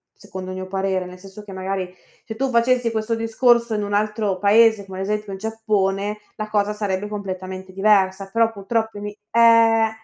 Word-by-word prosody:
secondo 185 0 -8
il - - -6
mio 185 0 -6
parere, 190 -1 -1
nel 180 0 -11
senso 195 +2 -12
che 205 - -11
magari 190 -1 -4 0.3
se 220 -1 -8
tu 270 +1 0
facessi 240 0 +2
questo 220 +1 -2
discorso 235 +1 +2
in 210 -1 -1
un 205 0 -4
altro 210 -2 0
paese, 215 +1 +4
come 190 -1 -8
ad 190 - -2
esempio 210 0 -3
il 190 - -7
Giappone, 210 -2 -1 0.2
la 215 - -4
cosa 210 -1 +1
sarebbe 205 -1 -2
completamente 190 -2 -6
diversa. 195 -1 +2
Però 230 0 +3
purtroppo 220 +1 -2
in 205 - -5
i 205 0 -9
eh, 230 -1 +5
210 Hz, 190 wpm, -21 LUFS, 190-225 Hz, 0.3 s, eh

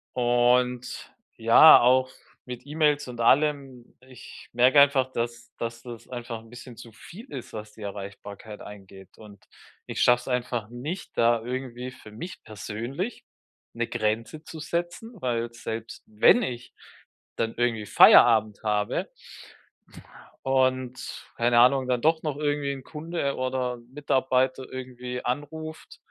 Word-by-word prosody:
Und, 125 0 +1 0.3
ja, 115 +8 +8
auch 130 +1 +3 0.4
mit 125 +1 -8
E-Mails 150 -1 +1
und 120 -1 -9
allem, 135 -1 +1
ich 130 -1 -14
merke 125 +4 +5
einfach, 135 -2 +3
dass 120 0 -4
dass 115 0 -5
das 120 -2 -10
einfach 120 -2 -6
'n 115 - -18
bisschen 120 0 -12
zu 120 -1 -12
viel 200 - -13
ist, 125 -3 -8
was 105 -1 -8
die 110 - -11
Erreichbarkeit 100 +1 -8
eingeht. 95 -2 -13
Und, 105 -2 -15 0.4
ich - - -4
schaffe 125 0 +5
es - - -15
einfach 125 -3 -2
nicht 145 +10 -7
da 115 0 +3
irgendwie 125 0 -5
für 110 -4 -14
mich 165 +13 -9
persönlich 115 - -6 0.5
'ne 120 0 -2
Grenze 115 +7 -2
zu 160 - -10
setzen, 175 +8 -4
weil 120 -1 -2
selbst 115 0 -7
wenn 110 - +5
ich 125 - -5 0.6
dann 115 0 -1
irgendwie 115 -3 0
Feierabend 110 0 +6
habe 105 - -1 1.4
und 130 -1 -1
keine 120 0 +3
Ahnung, 130 +1 +4
dann 125 -2 0
doch 160 +1 +2
noch 150 -2 -3
irgendwie 145 -1 -1
'n 135 -1 -7
Kunde 155 -1 -4
oder 130 -1 -2
Mitarbeiter 130 -2 0
irgendwie 125 -1 -6
anruft 155 +5 -5
125 Hz, 135 wpm, -26 LUFS, 115-135 Hz, 1.4 s, ja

